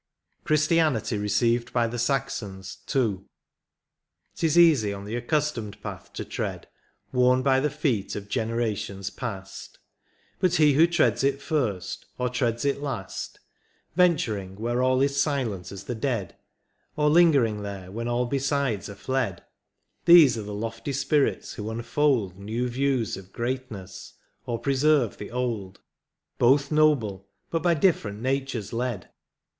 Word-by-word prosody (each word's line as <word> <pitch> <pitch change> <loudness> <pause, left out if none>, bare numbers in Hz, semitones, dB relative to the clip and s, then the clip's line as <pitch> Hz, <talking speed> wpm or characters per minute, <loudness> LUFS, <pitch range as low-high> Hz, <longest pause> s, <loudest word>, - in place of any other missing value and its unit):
CHRISTIANITY 155 -6 +2
RECEIVED 115 +4 +1
BY 120 -1 +2
THE 120 +1 -4
SAXONS. 105 -7 -2
— - - -7
II. 110 -8 +2 1.2
'T 165 - +1
IS 160 - +1
easy 150 -12 +5
on 100 0 -7
the 110 +3 -4
accustomed 120 -4 -2
path - - -7
to - - -5
tread, - - -4 0.4
Worn 125 0 +3
by 135 -1 +4
the 150 +2 +1
feet 135 -9 -1
of 100 -1 -6
generations 110 -4 -2
past; 95 -6 -7 0.6
But 185 -2 +2
he 150 -2 +5
who 160 +5 +6
treads 175 -5 +2
it 140 0 +1
first, 120 - -2
or 125 0 0
treads 120 -1 -1
it 140 0 0
last, 125 -10 -5 0.5
Venturing 115 - +1
where 120 +4 -1
all 130 0 +3
is 140 0 +2
silent 125 - -2
as 95 -1 -8
the 120 - -4
dead 115 -6 -2 0.3
— - - -45
Or 150 0 +2
lingering 145 -10 +4
there 100 -2 -7
when 115 +3 -4
all 120 +1 0
besides 135 -5 -1
are 100 - -8
fled 115 -5 -2 0.3
— 105 +2 -48
These 165 -8 +8
are 110 - -4
the 105 0 -7
lofty 115 +6 -4
spirits 140 +1 0
who 105 +1 -5
unfold 115 -4 0
New 110 +5 -2
views 130 -4 0
of 95 0 -12
greatness, 120 -6 -5 0.3
or 120 - -1
preserve 140 -2 +2
the - - -7
old. 115 -6 -3 0.6
Both 140 +4 +4
noble, 115 -11 +2 0.2
but 165 - 0
by 175 -1 +3
different 140 - +1
natures 130 -4 -2
led. 120 -5 -3
120 Hz, 150 wpm, -26 LUFS, 105-140 Hz, 1.2 s, These